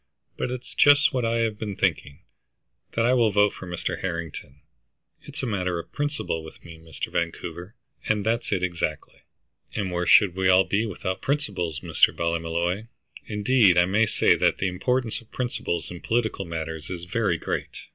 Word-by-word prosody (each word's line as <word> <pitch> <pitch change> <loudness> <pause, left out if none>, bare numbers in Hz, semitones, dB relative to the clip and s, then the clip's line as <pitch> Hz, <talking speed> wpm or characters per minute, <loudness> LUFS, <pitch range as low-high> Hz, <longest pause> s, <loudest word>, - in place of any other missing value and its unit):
"But - - -2
it's 125 0 -6
just 145 0 +5
what 125 -3 0
I 115 0 +1
have 110 -2 -1
been 105 -3 -4
thinking, 70 -5 -1 0.7
that 115 - +1
I 125 - +4
will 120 -3 +4
vote 105 +1 +3
for 95 - -9
Mr. 85 -1 -3
Harrington. 85 -6 -5 0.6
It's - - -8
a - - +1
matter 90 -6 -1
of 85 - -7
principle 145 - -2
with 80 - -13
me, 85 -1 -11
Mr. 80 -2 -6
Vancouver, 85 +4 -4 0.3
and 105 -2 +1
that's 115 +1 0
it 95 -3 0
exactly." 85 -4 -3 0.6
"And 100 -4 -2
where 90 0 -1
should 100 -4 +6
we 95 0 +2
all 95 +1 +6
be 105 +4 0
without 95 -2 -4
principles, 100 - -2
Mr. - - +3
Ballymolloy? 85 +4 -1 0.4
Indeed 105 -3 +4
I 90 - +6
may 105 +4 +2
say - - +4
that - - +2
the 95 - 0
importance 120 +6 -1
of 115 - -22
principles 120 -10 -3
in 85 - -8
political 110 -4 -1
matters 80 -2 -5
is 90 -2 -5
very 90 - 0
great." - - -4
95 Hz, 175 wpm, -25 LUFS, 85-115 Hz, 0.7 s, should